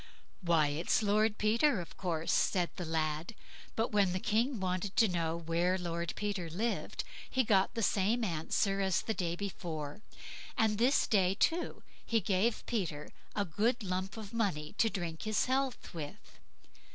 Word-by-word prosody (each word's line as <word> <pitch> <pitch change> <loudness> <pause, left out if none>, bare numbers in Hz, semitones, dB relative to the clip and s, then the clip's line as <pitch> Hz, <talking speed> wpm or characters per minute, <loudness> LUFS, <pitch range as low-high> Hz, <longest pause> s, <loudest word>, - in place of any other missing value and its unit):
"Why, 165 -5 +3
it's 165 +10 +1
Lord 210 +1 +2
Peter, 230 +3 +3
of 170 - -8
course", 165 -3 -1
said 175 -2 +2
the 180 - -4
lad; 160 +4 -1 0.4
but 225 +1 0
when 200 -4 +3
the 185 - 0
King 230 +5 +1
wanted 185 +1 -2
to 225 - +6
know 165 -3 -1
where 170 +2 +1
Lord 170 -2 -3
Peter 200 -5 -2
lived, 215 +8 -2 0.3
he 260 - +2
got 200 -1 +3
the 230 - -1
same 215 +5 +2
answer 195 +2 0
as 190 -2 +1
the 220 - -1
day 175 -4 -1
before; 170 -4 -5 0.6
and 220 -1 +2
this 255 +5 +4
day, 190 -3 +3
too, 330 - 0 0.2
he 230 - +2
gave 200 +3 +1
Peter 165 -10 -2 0.3
a 205 - +1
good 220 +8 0
lump 185 +2 -3
of 215 0 -8
money 190 -10 -1
to 225 - +5
drink 170 -5 -4
his 215 -1 +1
health 265 0 -1
with. 165 +5 -8
195 Hz, 165 wpm, -33 LUFS, 170-220 Hz, 0.6 s, to